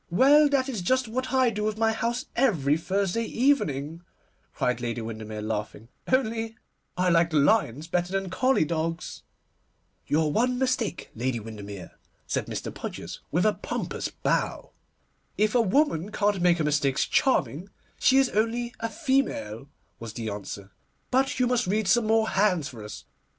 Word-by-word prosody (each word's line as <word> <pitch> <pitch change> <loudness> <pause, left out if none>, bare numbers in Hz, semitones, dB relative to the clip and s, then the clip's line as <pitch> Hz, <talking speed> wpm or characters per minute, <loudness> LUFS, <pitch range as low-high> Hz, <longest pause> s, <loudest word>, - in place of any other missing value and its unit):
'Well, 285 - +6
that 275 -2 +1
is 235 -8 -3
just 255 +7 +1
what 255 +4 -3
I 260 -3 +3
do 210 -1 -3
with 215 0 -1
my 225 0 +2
house 235 +4 -2
every 165 - +2
Thursday 195 +6 -1
evening,' 165 - 0 0.5
cried 125 -1 -1
Lady 120 -1 -2
Windermere, 110 -1 -6
laughing, 110 +1 -4 0.2
'only 225 -3 0 0.4
I 180 0 +2
like 165 -1 +3
lions 150 - +2
better 175 +1 -1
than 195 -2 -2
collie 255 -2 +2
dogs.' 165 +1 -3 0.9
'Your 155 0 +2
one 245 +7 +1
mistake, 250 -7 -1
Lady 120 +1 -2
Windermere,' 105 -4 -9 0.3
said - - -2
Mr. - - -5
Podgers, - - -7
with 175 +6 +2
a 215 - +4
pompous - - -4
bow. - - -2 0.7
'If 215 0 +2
a 245 - +4
woman 215 - +1
can't 205 -3 +1
make 175 -1 +4
her 160 - 0
mistakes 145 -3 +1
charming, 195 - +1 0.3
she 260 - +4
is 270 -1 +4
only 235 +3 -1
a 230 - -2
female,' 260 - -1 0.3
was 115 -1 -7
the 110 -2 -4
answer. 100 -1 -7 0.4
'But 265 +1 +1
you 250 - +4
must 245 -3 +1
read 210 +1 0
some 220 +4 +3
more 220 0 +3
hands 190 -7 +2
for 115 -6 -10
us. 105 - -9
195 Hz, 160 wpm, -26 LUFS, -, 0.9 s, Well